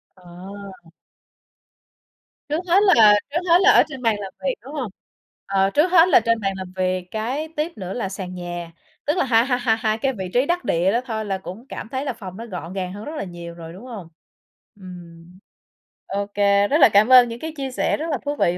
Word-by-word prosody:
Ờ. 185 - -21 2.3
Trước 305 +3 0
hết 360 +3 +5 0.2
là 210 -2 +7
trước 325 +4 -1
hết 345 +2 +6
là 410 - +7
ở - - +6
trên 265 -4 -8
bàn 225 -3 +2
làm 195 -2 -7
việc, 270 -2 0
đúng 275 +5 -11
hông? 255 -9 -4 0.5
Ờ, 195 0 +1
trước 305 - +2
hết 345 -1 +6
là - - +7
trên 230 0 0
bàn 195 -2 -1
làm 185 -1 -8
việc, 185 -1 -1
cái 255 +8 -3
tiếp 315 +3 -1
nữa 185 -1 -5
là 210 -6 -3
sàn 185 -1 -7
nhà, 175 -1 -6 0.3
tức 300 +5 0
là 360 - +2
hai 235 -1 +3
hai 250 -2 0
hai 225 -3 +1
hai 215 0 0
cái 265 +3 -1
vị 190 -4 -6
trí 250 +3 +3
đắc 350 +2 -1
địa 175 +3 +2
đó 240 +3 +1
thôi 220 -2 -4
là 195 -1 -2
cũng 190 +6 -10
cảm - - -7
thấy 265 +2 -3
là 265 - -2
phòng 190 -3 -10
nó 230 - -7
gọn 180 -4 -7
gàng 185 -1 -4
hơn 205 +1 -8
rất 310 +2 -6
là - - -3
nhiều 170 -2 -8
rồi, 165 -1 -10
đúng 205 +7 -12
hông? 210 -9 -8 0.7
Ừm, 175 -1 -13 0.7
ô 200 +1 -2
kê, 200 0 +3
rất 295 - +2
là - - +8
cảm 210 +4 +5
ơn 250 -2 +8
những 230 - -7
cái 320 +2 -6
chia 270 -1 -4
sẻ - - 0
rất 325 +1 -3
là 280 - 0
thú 290 +1 -2
vị 175 -8 +1
215 Hz, 235 wpm, -22 LUFS, 185-265 Hz, 2.3 s, là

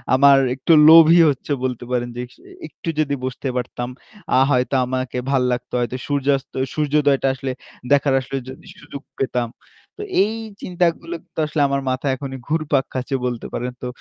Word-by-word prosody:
আমার 140 +1 +6 0.2
একটু 150 +5 +2 0.2
লোভই 165 +1 +8
হচ্ছে 140 +1 -4
বলতে 125 -2 -2
পারেন 120 -1 -1
যে 125 - -3
স - - -27 0.3
একটু 165 - -8
যদি 145 -2 +1
বসতে 130 +1 -4
পারতাম 120 0 -4 0.5
আ - - +6
হয়তো 125 +1 +1
আমাকে 130 0 -3
ভালো 130 -2 +2
লাগতো। 125 0 -6
হয়তো 120 +1 -2
সূর্যাস্ত, 140 -1 0 0.2
সূর্যোদয়টা 145 -2 +2
আসলে 135 0 -4 0.4
দেখার 140 -1 +3
আসলে 135 +1 -5
যদি 130 - -11
সুযোগ 140 - -9 0.2
পেতাম। 125 -2 -1 0.5
তো - - -7 0.2
এই 215 +2 -2 0.3
চিন্তাগুলো 170 -1 -1
কিন্তু - - -10
আসলে 150 0 -1
আমার 140 0 -1
মাথায় 130 +1 -1
এখনই 135 0 -7
ঘুরপাক 150 -3 0
খাচ্ছে 130 +1 -2
বলতে 120 -2 -3
পারেন 125 +1 -3
তো। - - -2
135 Hz, 165 wpm, -20 LUFS, 125-145 Hz, 0.5 s, লোভই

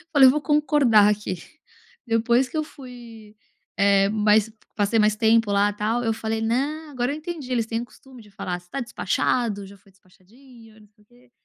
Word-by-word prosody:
Olha, 275 - +8
eu 255 - +8
vou 300 - -2
concordar 275 -7 +3
aqui." 210 -3 -2 0.7
Depois 235 +3 +2
que - - -5
eu 310 - 0
fui 240 -7 -13 0.4
eh, 200 0 +3
mas 215 0 +2 0.2
passei 210 +1 +1
mais 210 0 +3
tempo 225 -1 +2
lá 200 +1 +2
tal, 220 +4 -2
eu 225 - 0
falei: 220 0 -3
"Não, 285 +8 -2
agora 250 0 -2
eu - - -5
entendi," 310 -4 -7
eles 235 -3 0
têm 230 0 -2
o - - -6
costume 250 +1 -17
de 210 -1 -19
falar 185 -3 -5
"você 175 - -24
está 275 - -5
despachado? 205 0 -1
Já 200 +1 -15
foi 195 0 -25
despachadinho, 220 +4 -20
não 210 - -20
sei 210 0 -29
o - - -37
quê." 245 +1 -25
225 Hz, 200 wpm, -23 LUFS, 210-255 Hz, 0.7 s, Olha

